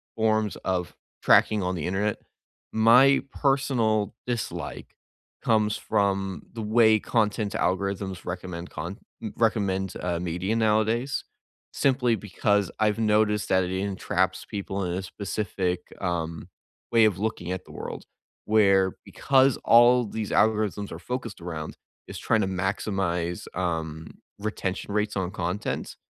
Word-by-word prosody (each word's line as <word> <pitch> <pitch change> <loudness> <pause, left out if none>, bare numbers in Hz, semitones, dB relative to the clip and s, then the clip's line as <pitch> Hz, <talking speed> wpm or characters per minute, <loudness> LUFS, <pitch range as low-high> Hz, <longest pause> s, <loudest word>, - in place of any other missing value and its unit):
forms 110 -2 +1
of 90 -2 -1 0.3
tracking 105 -2 +4
on 90 0 -1
the 80 - -3
Internet. 100 +3 0 0.5
My 125 +5 +6
personal 120 -7 +1
dislike 120 -4 -4 0.5
comes 105 -2 +2
from 100 -2 -1
the 115 - -5
way 110 0 +4
content 105 -2 0
algorithms 95 0 -2
recommend 90 -1 -6
con 95 +5 -5 0.4
recommend, 100 -4 +1
uh, 85 -1 -1
media 90 +5 -2
nowadays 110 +4 +1 0.5
simply 125 -4 +2
because 100 0 0
I've 110 0 +2
noticed 105 -1 +2
that 95 0 +3
it 90 - -3
entraps 95 -1 -1
people 100 -1 -4
in 85 - -2
a 95 - -2
specific, 95 -2 -3 0.2
um, 85 -1 -3 0.4
way 115 -2 +6
of 100 -3 +1
looking 100 -5 -2
at 95 0 -4
the - - -14
world - - -7 0.4
where, 100 -3 +4
because 135 -1 +3
all 120 +1 +6
these 105 0 -4
algorithms 105 -2 +1
are 85 - -7
focused 120 -1 -5
around 80 -3 -6 0.3
is - - -7
trying 110 -2 +1
to 95 - 0
maximize, 95 -2 -2
um, 80 -3 -3 0.2
retention 100 -1 -3
rates 105 0 0
on 95 -1 -2
content 90 +1 -3
100 Hz, 130 wpm, -26 LUFS, 95-110 Hz, 0.5 s, My